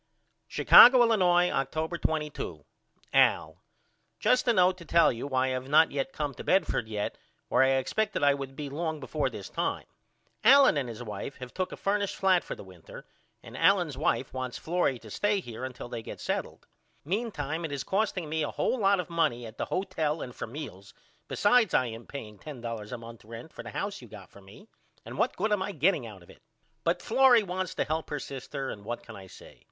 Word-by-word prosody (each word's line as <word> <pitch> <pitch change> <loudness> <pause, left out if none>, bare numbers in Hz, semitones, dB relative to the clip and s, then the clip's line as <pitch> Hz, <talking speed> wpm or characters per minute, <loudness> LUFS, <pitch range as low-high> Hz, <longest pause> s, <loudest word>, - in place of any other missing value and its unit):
Chicago, 250 0 +8
Illinois, 180 -6 +3
October 155 +5 -2
22. 150 - -3 0.5
AL: - - +3 0.6
Just 250 0 +2
a 240 - +5
note 185 -2 +4
to - - -10
tell 170 0 +4
you 120 +3 -5
why 130 -2 +1
I - - -1
have 130 +1 -4
not 155 +2 +5
yet 135 -1 -2
came 145 -1 -3
to - - -9
Bedford 185 - +1
yet 105 -2 -4 0.3
where - - +3
I 130 0 +4
expected 200 +9 -1
I 145 0 +5
would 135 -1 -6
be 145 0 -5
long 160 +2 -3
before 140 +1 -2
this 105 -6 -8
time. - - -3 0.6
Allen 270 - +7
and 135 -4 -2
his 115 +1 -7
wife 105 +5 -6
have 125 -1 -9
took 185 -1 -2
a - - -7
furnished 200 0 -1
flat 190 -2 +3
for - - -6
the - - -11
winter 90 -4 -13 0.4
and - - -11
Allen's - - +3
wife - - -1
wants 130 -1 -4
Florrie 170 -6 0
to 110 -2 -13
stay 205 - +1
here 120 -8 -8
untill 130 -2 -6
they 120 -1 -6
get - - -9
settled. - - -4 0.4
Meentime 170 - -3
it 160 - -4
is 140 -2 -3
costing 195 -4 -1
me 160 +1 -2
a 150 - -1
hole 260 - -1
lot 200 -2 +3
of 180 - -3
money 165 -9 0
at 110 0 -11
the - - -1
hotel 165 -5 -2
and 125 - -8
for - - -6
meals 110 -7 -9 0.3
besides 225 +2 +3
I 130 - +3
am 115 0 -8
paying 105 -7 -9
$10 115 -6 -7
a 125 - -4
month 115 -1 -12
rent 115 +7 -10
for - - -8
the - - -9
house 200 -4 -4
you 120 - -12
got 105 -3 -12
for 100 - -15
me 100 - -16 0.4
and - - -8
what - - +1
good 215 - 0
am 205 -2 +2
I 200 +1 -3
getting 155 -5 +1
out 100 -5 -12
of - - -16
it? - - -20 0.4
But - - 0
Florrie 255 -4 +5
wants 185 -1 -4
to - - +1
help 155 +2 -3
her 150 - -3
sister 135 0 -6
and 100 - -9
what 120 +3 -5
can 110 - -11
I 95 -1 -11
say? - - -15
145 Hz, 215 wpm, -28 LUFS, 120-185 Hz, 0.6 s, Chicago